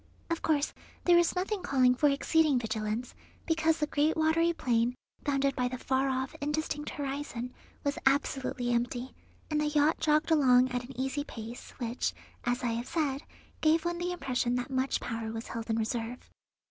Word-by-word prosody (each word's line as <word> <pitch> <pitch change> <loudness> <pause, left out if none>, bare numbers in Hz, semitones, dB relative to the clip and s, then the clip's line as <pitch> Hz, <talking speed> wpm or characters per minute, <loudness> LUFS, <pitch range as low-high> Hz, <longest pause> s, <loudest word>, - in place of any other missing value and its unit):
Of 335 - 0
course 300 -2 +1 0.3
there 350 - +6
was 345 +1 +4
nothing 385 +2 -1
calling 260 -6 +4
for 290 +4 +3
exceeding 295 0 +3
vigilance, 220 0 -2 0.3
because 325 -1 +2
the 300 - +1
great 300 +2 +1
watery 320 +2 +3
plain, 245 -5 +1 0.3
bounded 275 -1 +1
by 250 -1 +1
the 255 +1 -4
far 265 +2 +1
off, 260 0 -1
indistinct 295 0 -2
horizon, 270 -3 -4 0.3
was 285 0 -1
absolutely 265 -3 +1
empty, 245 +2 -1 0.4
and 300 0 +2
the 300 - +1
yacht 295 +1 +3
jogged 305 +1 +2
along 255 -4 +5
at 245 0 -1
an 250 0 -10
easy 270 +2 -1
pace, 230 -3 -8
which, 240 0 -1 0.3
as 245 +1 0
I 240 - +1
have 235 +2 -3
said, 285 -4 0 0.4
gave 320 +1 +3
one 345 0 -1
the 355 +1 -1
impression 255 -7 0
that 250 +2 -3
much 260 +1 0
power 225 -1 -3
was 225 +1 -6
held 230 0 -5
in 225 - +1
reserve. 230 +2 -3
270 Hz, 175 wpm, -30 LUFS, 245-305 Hz, 0.4 s, there